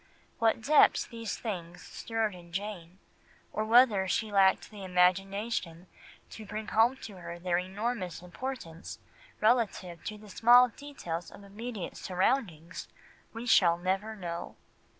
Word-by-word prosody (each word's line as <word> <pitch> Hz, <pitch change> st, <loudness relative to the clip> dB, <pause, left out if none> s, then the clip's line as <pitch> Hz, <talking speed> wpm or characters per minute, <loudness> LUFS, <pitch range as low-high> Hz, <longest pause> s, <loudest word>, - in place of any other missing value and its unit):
What 225 Hz, 0 st, +2 dB
depths 300 Hz, +3 st, +5 dB
these 230 Hz, -2 st, -5 dB
things 175 Hz, -6 st, -6 dB
stirred 225 Hz, -2 st, -2 dB
in 175 Hz, -1 st, -13 dB
Jane, 185 Hz, -2 st, -5 dB, 0.6 s
or 215 Hz, -, -1 dB
whether 220 Hz, -4 st, +5 dB
she 215 Hz, +3 st, -1 dB
lacked 195 Hz, 0 st, +3 dB
the 205 Hz, -2 st, -9 dB
imagination 185 Hz, 0 st, 0 dB, 0.5 s
to 220 Hz, -, -9 dB
bring 215 Hz, +1 st, -6 dB
home 235 Hz, +4 st, +3 dB
to 205 Hz, -4 st, -8 dB
her 170 Hz, -1 st, -7 dB
their 175 Hz, 0 st, 0 dB
enormous 190 Hz, -1 st, -4 dB
importance 180 Hz, -4 st, -7 dB, 0.4 s
relative 215 Hz, -7 st, +1 dB
to 215 Hz, -, -4 dB
the 210 Hz, 0 st, -14 dB
small 245 Hz, +5 st, +6 dB
details 205 Hz, -, -6 dB
of 200 Hz, -, -13 dB
immediate 210 Hz, 0 st, -6 dB
surroundings, 185 Hz, -, -1 dB, 0.4 s
we 230 Hz, +2 st, -7 dB
shall 175 Hz, -7 st, +5 dB
never 190 Hz, +5 st, -2 dB
know. 170 Hz, -4 st, -6 dB
200 Hz, 130 wpm, -30 LUFS, 180-225 Hz, 0.6 s, small